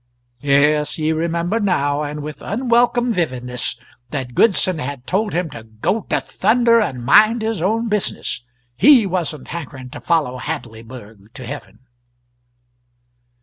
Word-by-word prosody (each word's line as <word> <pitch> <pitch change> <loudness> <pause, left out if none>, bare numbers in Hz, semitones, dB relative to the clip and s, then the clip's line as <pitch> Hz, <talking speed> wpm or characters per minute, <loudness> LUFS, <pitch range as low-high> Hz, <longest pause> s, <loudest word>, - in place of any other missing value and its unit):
Yes, 145 +1 +3
he 155 0 0
remembered 170 +6 -1
now, 145 -6 +1
and 150 0 -4
with 150 0 -7
unwelcome 240 +2 +1
vividness, 125 - -2 0.3
that 125 -2 -4
Goodson 185 - +2
had 130 -2 -5
told 205 +6 0
him 175 +1 0
to 115 - -8
go 110 - -2
to - - +2
thunder 235 0 +3
and 125 - -3
mind 215 - +5
his 220 -5 -2
own 225 +6 0
business 210 - -2 0.3
he 260 - +6
wasn't 170 -6 -3
hankering 135 -6 -7
to - - -9
follow 150 -7 0
Hadleyburg 110 -3 -8
to 130 - -8
heaven! 115 -5 -9
155 Hz, 135 wpm, -19 LUFS, 130-210 Hz, 0.3 s, he